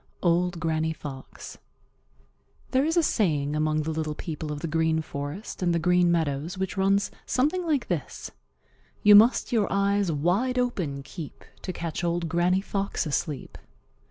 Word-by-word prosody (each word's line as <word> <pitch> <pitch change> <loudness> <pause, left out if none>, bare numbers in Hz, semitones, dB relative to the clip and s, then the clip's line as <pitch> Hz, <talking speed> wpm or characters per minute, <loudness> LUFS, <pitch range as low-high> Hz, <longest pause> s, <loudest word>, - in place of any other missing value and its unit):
—Old 175 0 +2
Granny 160 0 0
Fox. 135 -4 -9 1.1
There 260 +1 +3
is 325 +3 0
a 340 - +5
saying 150 - +1
among 155 0 +1
the 160 - -2
little 155 -1 -3
people 155 -1 -5
of 145 -1 -5
the 165 - -2
Green 160 0 +1
Forest 145 +10 -6
and 175 -2 +2
the - - +3
Green 180 +1 +3
Meadows 160 +1 -1
which 190 0 -3
runs 195 +1 +2 0.2
something 305 +8 +1
like 290 -5 +1
this: 170 -6 -4 0.7
"You 210 - +8
must 220 +7 +6
your 220 -4 +2
eyes 200 -1 +2
wide 185 - +1
open 180 - -1
keep 150 +2 -9 0.2
To 185 - -4
catch 170 -1 -4
Old 170 0 0
Granny 180 +2 +2
Fox 195 -2 -2
asleep." 150 -2 -3
175 Hz, 155 wpm, -26 LUFS, 155-200 Hz, 1.1 s, You